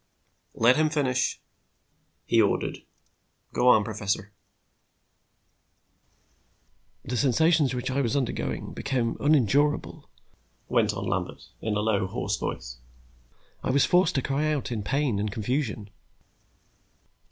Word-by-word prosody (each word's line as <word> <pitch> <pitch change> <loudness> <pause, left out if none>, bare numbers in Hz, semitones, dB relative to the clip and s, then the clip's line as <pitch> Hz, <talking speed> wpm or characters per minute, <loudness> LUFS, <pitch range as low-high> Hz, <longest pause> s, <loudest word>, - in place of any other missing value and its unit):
"Let 120 +4 +4
him 155 0 +3
finish," 135 -5 0 0.9
he - - +4
ordered. - - 0 0.7
"Go 125 - +2
on, 110 -4 +6
professor." 100 -1 -3 2.7
"The 125 - -3
sensations 140 +3 +3
which 125 +1 -3
I 140 +2 +1
was 130 +2 0
undergoing 65 - -3
became 125 -4 -1
unendurable," 145 0 +1 0.6
went - - +2
on - - -5
Lambert, - - -4
in 110 -1 -1
a 105 - 0
low, 105 -3 +1
hoarse - - -2
voice. - - -5 0.8
"I - - -2
was 135 +1 +4
forced 180 -2 +3
to 135 - +1
cry 150 +3 0
out 140 -5 -2
in 110 -3 -2
pain 135 -1 0
and 105 0 -2
confusion. 110 -1 -3
125 Hz, 120 wpm, -26 LUFS, 105-145 Hz, 2.7 s, on